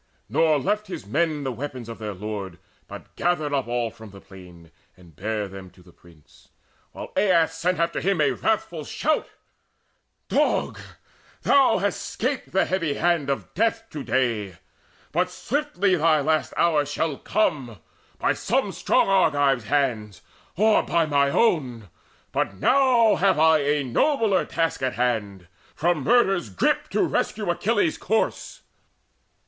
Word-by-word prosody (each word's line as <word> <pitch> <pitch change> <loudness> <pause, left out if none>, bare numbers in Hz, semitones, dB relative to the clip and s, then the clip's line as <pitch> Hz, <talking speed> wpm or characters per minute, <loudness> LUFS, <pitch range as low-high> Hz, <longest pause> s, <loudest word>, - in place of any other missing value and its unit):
Nor 160 -2 +2
left 210 +10 -1
his 180 - -7
men 150 +6 -1
The 135 - -2
weapons 125 -1 -6
of 115 0 -8
their 105 -2 -5
lord, 100 -2 -6 0.3
but - - -12
gathered 155 -4 0
up 135 -4 -1
All 120 -1 -1
from 110 -1 -13
the 100 0 -13
plain, 90 -4 -15 0.3
and 85 -4 -18
bare 105 +2 -3
them 95 -1 -10
to 90 - -21
the 90 - -18
prince; 85 -4 -22 0.4
While - - -9
Aias 165 -4 +2
after 170 -1 0
him 195 -1 +1
sent 150 -2 +2
a - - -2
wrathful 175 -7 -2
shout: 305 - -1 1.0
"Dog, - - 0 0.6
thou 270 -5 +4
hast 200 +2 -2
'scaped 260 +4 -3
the 190 - +2
heavy 165 -6 -1
hand 170 -4 +1
of 140 - -3
death 225 +2 -1
To 150 -3 -6
day! 110 -10 -1 0.5
But 180 +4 0
swiftly 205 -3 -1
thy 160 -2 +3
last 155 +2 0
hour 160 -4 +3
shall 145 0 -2
come 135 - -1 0.4
By - - +1
some - - -1
strong - - +1
Argive's 145 - +2
hands, 115 - -1 0.3
or 215 +2 +4
by 170 -1 +1
mine 140 -2 +2
own, 125 - 0 0.4
But 95 - -1
now 245 - +3
have 190 -1 +2
I 160 0 +5
a 145 0 0
nobler 220 - +1
task 165 -3 -2
in 130 -1 -1
hand, 105 -7 -2 0.3
From 170 -2 0
murder's 195 - +2
grip 95 - 0
to - - +1
rescue 205 -4 -1
Achilles' 205 -2 0
corse." 220 +3 -2
150 Hz, 150 wpm, -24 LUFS, 115-185 Hz, 1.0 s, I